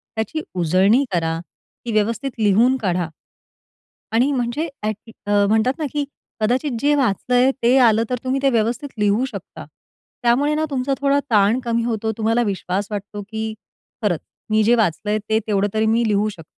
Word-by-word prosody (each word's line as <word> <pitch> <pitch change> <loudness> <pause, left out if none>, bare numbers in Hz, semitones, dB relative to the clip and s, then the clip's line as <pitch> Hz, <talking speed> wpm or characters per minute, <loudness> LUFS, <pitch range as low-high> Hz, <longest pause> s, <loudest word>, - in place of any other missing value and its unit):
त्याची 225 +8 -2
उजळणी 185 - +3
करा, 165 -1 0
ती 175 +7 -12
व्यवस्थित 225 +5 0
लिहून 220 +5 +4
काढा. 180 -7 -1 1.0
आणि 245 +6 +3
म्हणजे 260 +4 -1 0.2
ॲट 215 0 -1 0.3
अ, 205 0 +3
म्हणतात 220 +4 +2
ना 310 - -1
की 295 -1 0 0.4
कदाचित 250 +7 +1
जे 290 +4 +3
वाचलंय 250 0 +2
ते 245 +3 +5
आलं 225 0 +3
तर, 250 - 0
तुम्ही 260 +1 0
ते 275 - +5
व्यवस्थित 235 +4 0
लिहू 210 +4 +2
शकता. - - -9 0.6
त्यामुळे 265 +5 +3
ना, 310 +1 0
तुमचा 275 -1 -1
थोडा 280 0 +3
ताण 215 +2 +4
कमी 235 -1 0
होतो, 220 -2 -1
तुम्हाला 225 +2 +1
विश्वास 195 -1 -2
वाटतो 205 0 -5
की 220 0 -3 0.5
"खरंच, 180 -7 +1 0.3
मी 215 0 +3
जे 235 +3 +4
वाचलंय 210 0 0
ते 220 0 +3
तेवढं 205 -1 +1
तरी 220 0 +1
मी 225 +1 +2
लिहू 210 0 +1
शकतो." 170 -6 -11
220 Hz, 165 wpm, -21 LUFS, 205-250 Hz, 1.0 s, ते